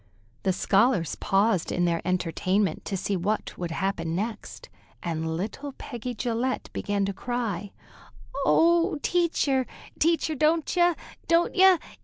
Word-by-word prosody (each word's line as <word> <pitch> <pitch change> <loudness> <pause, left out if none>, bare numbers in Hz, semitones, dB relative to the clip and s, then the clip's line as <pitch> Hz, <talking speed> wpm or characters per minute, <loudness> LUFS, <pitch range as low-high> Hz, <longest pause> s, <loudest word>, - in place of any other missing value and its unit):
The 190 - +1
scholars 195 - +2
paused 195 -2 +1
in 175 - +1
their 170 -1 0
entertainment 185 +1 0
to 195 - -2
see 200 +2 -1
what 200 +4 -2
would 175 -1 -4
happen 165 -2 -2
next, 215 +3 -5 0.4
and 160 -1 -2
little 275 +9 -5
Peggy 245 -1 -6
Gillette 245 +2 -2
began 205 -1 -1
to 200 - -2
cry: 215 -4 -3 0.7
"Oh, 335 +3 +4
Teacher, 305 -7 +1 0.3
Teacher, 325 0 +2
don't 310 +3 +1
ye! 350 -1 +4 0.3
don't 335 +1 +3
ye! 380 -1 +7
215 Hz, 130 wpm, -26 LUFS, 185-300 Hz, 0.7 s, ye